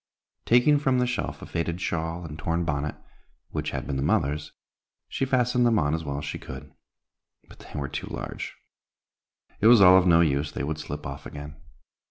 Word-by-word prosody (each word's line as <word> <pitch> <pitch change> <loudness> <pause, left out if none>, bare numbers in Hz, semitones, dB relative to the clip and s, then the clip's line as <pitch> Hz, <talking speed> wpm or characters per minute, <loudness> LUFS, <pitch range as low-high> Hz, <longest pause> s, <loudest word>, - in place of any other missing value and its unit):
Taking 125 +5 +5
from 135 -3 +2
the 125 - +2
shelf 125 -3 -3
a - - -6
faded 85 +1 -3
shawl 85 0 -3
and 80 -1 -8
torn 85 +2 -1
bonnet, 75 -1 -2 0.6
which - - -2
had - - -4
been 70 - -3
the - - -1
mother's, 75 +2 0 0.6
she 135 - -1
fastened 125 -1 +2
them 120 -2 +4
on 75 -3 +1
as 80 0 -2
well 70 -2 -3
as 70 - -5
she 70 - -5
could. - - -10 0.7
But - - -16
they - - -8
were 70 - -2
too - - -5
large; - - -6 1.0
it 110 - +4
was 120 -1 +8
all 95 -1 +8
of 90 - +1
no 85 -1 +6
use, 75 -2 +1
they - - -4
would 75 +2 -3
slip 75 -1 -6
off 70 0 -6
again. 75 +1 -9
80 Hz, 200 wpm, -26 LUFS, 75-115 Hz, 1.0 s, was